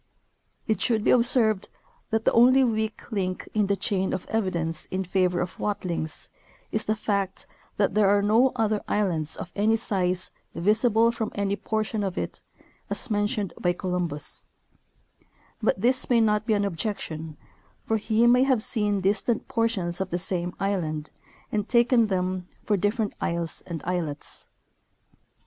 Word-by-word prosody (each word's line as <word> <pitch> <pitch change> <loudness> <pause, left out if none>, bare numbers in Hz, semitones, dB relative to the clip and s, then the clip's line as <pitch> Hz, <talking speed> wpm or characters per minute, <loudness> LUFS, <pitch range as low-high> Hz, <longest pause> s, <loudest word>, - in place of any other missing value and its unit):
It 220 - 0
should 225 -4 +2
be - - +4
observed 235 -4 +3 0.4
that 225 -1 0
the - - +5
only 255 +3 +6
weak 220 -2 -2
link 185 -3 -2
in 210 -2 +2
the 200 - +2
chain 190 -1 -1
of 185 - -3
evidence 170 -7 -1
in 190 +1 -2
favor 180 -1 +1
of 175 - -5
Watlings 175 -6 -3 0.4
is 215 - -1
the 215 - +1
fact 200 -3 -2 0.3
that 200 - +2
there 210 -2 +4
are 200 0 +3
no 230 +5 +4
other 215 -2 +1
islands 165 -7 0
of 180 - -7
any 220 +2 +3
size 185 -4 -1 0.2
visible 220 +4 +3
from 225 -2 -3
any 200 0 0
portion 215 0 -2
of 190 -1 -3
it, - - -4 0.5
as 265 - -3
mentioned 205 -1 0
by 175 0 +2
Columbus; 175 -5 -2 1.1
but - - +1
this 255 +2 +1
may 240 -2 +4
not 215 -1 +2
be 220 - +3
an 205 0 +1
objection, 160 -5 -4 0.5
for 225 - 0
he 220 +2 +2
may 245 +1 +6
have 260 -4 +3
seen 205 -4 +3
distant 210 +4 0
portions 200 -7 -1
of 190 - -2
the 175 - -1
same 180 -1 -2
island 160 -6 -2 0.4
and 210 -1 -1
taken 235 -1 +4
them 185 -2 -1 0.2
for 210 - +1
different 205 +2 0
isles 170 -1 -2
and 165 -4 -5
islets. 170 -5 -4
205 Hz, 155 wpm, -26 LUFS, 180-220 Hz, 1.1 s, only